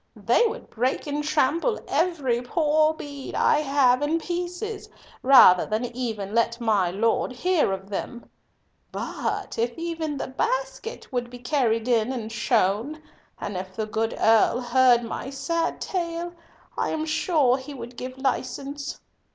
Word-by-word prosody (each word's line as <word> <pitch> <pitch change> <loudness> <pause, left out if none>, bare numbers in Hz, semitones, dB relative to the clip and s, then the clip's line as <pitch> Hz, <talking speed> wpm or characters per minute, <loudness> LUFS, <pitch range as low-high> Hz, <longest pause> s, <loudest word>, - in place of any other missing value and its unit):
They 475 - +3
would 465 +3 -7
break 250 +3 -1
and 295 0 -2
trample 310 - +1
every 285 -9 0
poor 310 +3 +2
bead 285 -3 -8
I 300 - +3
have 275 -3 +3
in 310 +3 +1
pieces 355 +5 -4 0.3
rather 250 -9 +8
than 215 +3 -2
even 220 -5 -4
let 230 +1 +1
my 210 -6 +2
Lord 225 +7 0
hear 320 - +1
of 190 0 -4
them. 235 +4 -5 0.6
But - - -4
if 235 +1 -1
even 330 -3 -3
my - - -3
basket 480 - -3
could 245 -2 -2
be 245 - -9
carried 240 -3 0
in 235 0 +2
and 230 -4 -5
shown, 225 +5 0 0.4
and 205 - -5
if 185 +1 -6
the 220 - -2
good 220 +1 -2
Earl 225 +2 +4
heard 245 0 +4
my 235 +3 -5
sad 305 +5 -2
tale, 345 -1 -3 0.4
I - - -1
am 315 0 -2
sure 310 -5 +2
he 275 +2 -9
would 240 -1 -9
give 255 +2 -7
license." 275 +2 -3
260 Hz, 150 wpm, -25 LUFS, 230-315 Hz, 0.6 s, rather